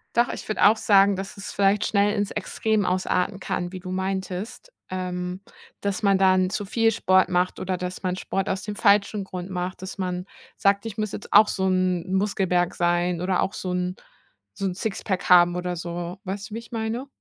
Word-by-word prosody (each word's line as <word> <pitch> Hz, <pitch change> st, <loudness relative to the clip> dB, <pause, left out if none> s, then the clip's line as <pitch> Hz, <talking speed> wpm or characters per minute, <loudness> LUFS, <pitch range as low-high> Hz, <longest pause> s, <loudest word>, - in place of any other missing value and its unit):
Doch, 235 Hz, 0 st, +3 dB
ich -, -, -6 dB
würd' 215 Hz, -, -3 dB
auch 215 Hz, +2 st, +6 dB
sagen, 200 Hz, -2 st, +4 dB
dass 195 Hz, 0 st, -6 dB
es 200 Hz, -, -7 dB
vielleicht 200 Hz, +1 st, +2 dB
schnell 205 Hz, 0 st, +2 dB
ins 205 Hz, -1 st, -1 dB
Extrem 210 Hz, 0 st, -1 dB
ausarten 185 Hz, +1 st, 0 dB
kann, 175 Hz, 0 st, -3 dB
wie 185 Hz, -, -6 dB
du 185 Hz, -, -6 dB
meintest, 190 Hz, -, -4 dB, 0.2 s
ähm, 180 Hz, 0 st, -4 dB, 0.4 s
dass 200 Hz, 0 st, -2 dB
man 195 Hz, -1 st, +4 dB
dann 185 Hz, -1 st, +4 dB
zu 205 Hz, +1 st, -3 dB
viel 225 Hz, +3 st, +2 dB
Sport 185 Hz, -3 st, +3 dB
macht 180 Hz, 0 st, 0 dB
oder 185 Hz, 0 st, -2 dB
dass 180 Hz, 0 st, -5 dB
man 185 Hz, -1 st, -1 dB
Sport 195 Hz, 0 st, -3 dB
aus 190 Hz, +1 st, -2 dB
dem 210 Hz, -1 st, -5 dB
falschen 200 Hz, -1 st, +3 dB
Grund 185 Hz, 0 st, -6 dB
macht, 180 Hz, 0 st, -4 dB
dass 190 Hz, +1 st, -7 dB
man 180 Hz, -1 st, -3 dB, 0.3 s
sagt: 200 Hz, +1 st, +2 dB
„Ich 215 Hz, -3 st, -6 dB
muss 215 Hz, -2 st, -2 dB
jetzt -, -, -7 dB
auch 215 Hz, -, +7 dB
so 190 Hz, 0 st, 0 dB
'n 185 Hz, 0 st, 0 dB
Muskelberg 190 Hz, -3 st, +1 dB
sein 175 Hz, 0 st, +1 dB
oder 180 Hz, +1 st, +1 dB
auch 190 Hz, -, 0 dB
so 180 Hz, -1 st, -4 dB
'n 180 Hz, 0 st, -2 dB, 0.6 s
so 195 Hz, -, -4 dB
'n 190 Hz, -, 0 dB
Sixpack 195 Hz, -1 st, -3 dB
haben 175 Hz, -1 st, +6 dB
oder 180 Hz, 0 st, -2 dB
so.“ 175 Hz, +1 st, -5 dB
Weißt 200 Hz, +2 st, -5 dB
du, -, -, -5 dB
wie -, -, -3 dB
ich 230 Hz, -, -15 dB
meine? 230 Hz, +3 st, -3 dB
190 Hz, 205 wpm, -24 LUFS, 180-205 Hz, 0.6 s, auch